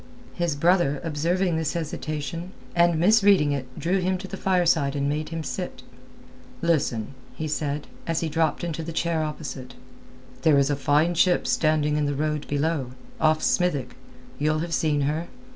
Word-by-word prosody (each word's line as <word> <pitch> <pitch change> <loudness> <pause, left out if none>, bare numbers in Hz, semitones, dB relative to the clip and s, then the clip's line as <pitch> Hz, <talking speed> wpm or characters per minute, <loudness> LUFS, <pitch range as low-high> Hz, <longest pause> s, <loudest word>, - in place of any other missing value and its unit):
His 170 -4 -1
brother 165 -2 +2
observing 170 +3 0
this 160 -1 -1
hesitation, 160 +1 -4 0.2
and 170 -1 +4
misreading 200 -5 +5
it 135 -2 -2
drew 185 +4 +1
him 185 +1 0
to 190 +1 -8
the 195 - -6
fireside 175 -7 +2
and 140 0 0
made 150 +2 -2
him 165 -1 -4
sit. 180 -6 -5 0.8
"Listen," 135 -9 0 0.2
he 155 - -3
said, 150 -1 -2 0.2
as 165 -1 0
he 165 - -1
dropped 160 +1 0
into 165 -2 -3
the 165 +1 -6
chair 165 0 0
opposite. 135 -4 -6 0.7
"There 155 -3 +5
is 140 +1 +3
a - - +1
fine 145 +5 +2
ship 175 +1 +3
standing 155 -1 +2
in 150 -1 +1
the 145 - -1
road 150 0 -2
below, 145 -3 -1 0.3
off 155 0 +3
Smithick. 145 -9 +1 0.4
You'll 155 +1 +2
have 170 - -6
seen 150 -3 +1
her. 155 +4 -1
155 Hz, 165 wpm, -25 LUFS, 145-170 Hz, 0.8 s, misreading